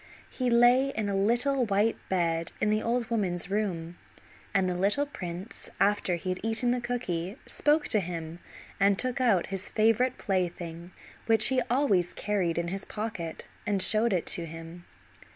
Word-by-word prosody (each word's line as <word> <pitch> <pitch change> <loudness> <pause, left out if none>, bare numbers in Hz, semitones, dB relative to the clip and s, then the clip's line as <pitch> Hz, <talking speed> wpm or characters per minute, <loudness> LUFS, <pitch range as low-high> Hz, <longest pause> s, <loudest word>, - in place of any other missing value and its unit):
He 255 -2 -1
lay 240 +3 +5
in 220 -6 -3
a 200 - -1
little 240 +7 +2
white 210 +1 +1
bed 165 -3 -1
in 210 - +1
the 215 0 +1
old 235 +1 -1
woman's 185 -5 -1
room, 175 -5 -3 0.5
and 190 -1 +1
the 180 - 0
little 200 +10 +1
prince, 185 -6 -7
after 200 -3 +2
he 180 +2 -5
had 185 - -2
eaten 225 +2 +1
the 250 0 -1
cooky, 200 -5 -3
spoke 295 +1 +1
to 215 - +3
him, 170 -2 -5 0.4
and 200 0 +3
took 255 +2 -2
out 200 -8 +2
his 195 0 -3
favorite 225 +4 +2
plaything, 175 -3 -3 0.4
which 225 -1 +6
he 260 -1 +2
always 235 -9 +1
carried 190 -5 -1
in 170 0 -1
his 195 +2 -4
pocket, 210 -7 -5 0.2
and 205 -2 +1
showed 220 +4 +5
it 180 -4 0
to 170 -1 0
him. 165 +2 -10
200 Hz, 170 wpm, -28 LUFS, 175-235 Hz, 0.5 s, which